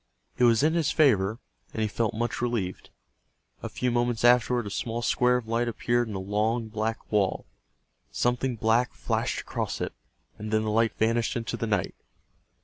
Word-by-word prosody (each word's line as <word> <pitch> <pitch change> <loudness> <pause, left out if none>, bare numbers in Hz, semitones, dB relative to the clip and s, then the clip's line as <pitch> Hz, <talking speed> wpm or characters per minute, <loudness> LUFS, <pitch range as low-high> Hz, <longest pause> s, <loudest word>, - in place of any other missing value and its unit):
It 125 - +5
was 115 +1 +4
in 155 +1 +3
his 165 -4 +1
favor, 110 -9 +3 0.4
and - - -5
he - - +1
felt 110 +1 -1
much 120 +1 -2
relieved. 115 -7 -2 0.7
A - - -5
few 125 -1 -1
moments 120 -1 0
afterward 120 -1 +4
a 100 - -5
small 115 +3 -3
square 125 +2 +3
of 120 -3 -6
light 115 +1 0
appeared 120 +1 0
in 105 - -6
the - - -2
long 110 +4 -1
black 110 +1 -3
wall. 100 -3 +1 0.7
Something 125 - 0
black 115 -1 +1
flashed - - -1
across - - -4
it, - - -3 0.5
and 105 +1 -5
then 110 0 +2
the 110 - -1
light 115 +1 +2
vanished 115 +3 +1
into 115 -2 -3
the 115 - -3
night. 100 -4 0
115 Hz, 180 wpm, -27 LUFS, 110-120 Hz, 0.7 s, It